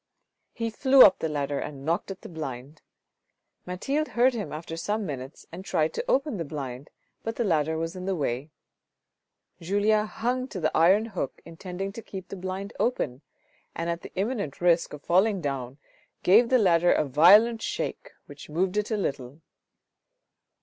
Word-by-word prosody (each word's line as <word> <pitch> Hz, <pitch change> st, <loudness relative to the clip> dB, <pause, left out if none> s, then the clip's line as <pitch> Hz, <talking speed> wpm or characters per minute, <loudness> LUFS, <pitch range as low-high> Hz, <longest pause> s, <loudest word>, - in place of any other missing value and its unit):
He 230 Hz, -1 st, -3 dB
flew 260 Hz, +3 st, +7 dB
up 190 Hz, -, +6 dB
the 160 Hz, -, -2 dB
ladder 145 Hz, -1 st, -2 dB
and 140 Hz, -2 st, -7 dB
knocked 165 Hz, +4 st, -1 dB
at 195 Hz, -1 st, -7 dB
the -, -, -9 dB
blind; 150 Hz, -2 st, -7 dB, 0.9 s
Mathilde 275 Hz, +12 st, -1 dB
heard 250 Hz, +2 st, +5 dB
him 220 Hz, -4 st, -4 dB
after 160 Hz, +2 st, -6 dB
some 205 Hz, +5 st, -2 dB
minutes 135 Hz, -3 st, -7 dB
and 175 Hz, +3 st, -8 dB
tried 160 Hz, -4 st, 0 dB
to -, -, -3 dB
open 275 Hz, -, +1 dB
the 170 Hz, -, -2 dB
blind 140 Hz, -2 st, -6 dB, 0.3 s
but 225 Hz, 0 st, -4 dB
the 240 Hz, -, 0 dB
ladder 160 Hz, -5 st, +1 dB
was 165 Hz, +2 st, -3 dB
in 185 Hz, 0 st, -6 dB
the 195 Hz, 0 st, 0 dB
way. 140 Hz, -2 st, -2 dB, 1.1 s
Julien 205 Hz, +4 st, +1 dB
hung 250 Hz, +4 st, -2 dB
to 195 Hz, -, -6 dB
the 155 Hz, -, 0 dB
iron 190 Hz, +7 st, +5 dB
hook 190 Hz, -, -5 dB
intending 180 Hz, +3 st, -6 dB
to 230 Hz, -, -8 dB
keep 190 Hz, -4 st, -9 dB
the -, -, -6 dB
blind 190 Hz, +2 st, -5 dB
open, 145 Hz, -, -1 dB, 0.5 s
and 170 Hz, +1 st, -2 dB
at 170 Hz, 0 st, -4 dB
the -, -, -10 dB
imminent 200 Hz, -, -2 dB
risk 175 Hz, -1 st, +3 dB
of 150 Hz, -, -9 dB
falling 195 Hz, +3 st, +3 dB
down, 135 Hz, -4 st, -4 dB, 0.5 s
gave 225 Hz, +6 st, +5 dB
the 255 Hz, -, +5 dB
ladder 175 Hz, -5 st, +4 dB
a -, -, +2 dB
violent 205 Hz, -, +6 dB
shake -, -, -4 dB, 0.2 s
which -, -, -12 dB
moved 180 Hz, +5 st, -1 dB
it 210 Hz, 0 st, 0 dB
a 220 Hz, -, 0 dB
little. 135 Hz, -6 st, -4 dB
180 Hz, 175 wpm, -26 LUFS, 155-215 Hz, 1.1 s, flew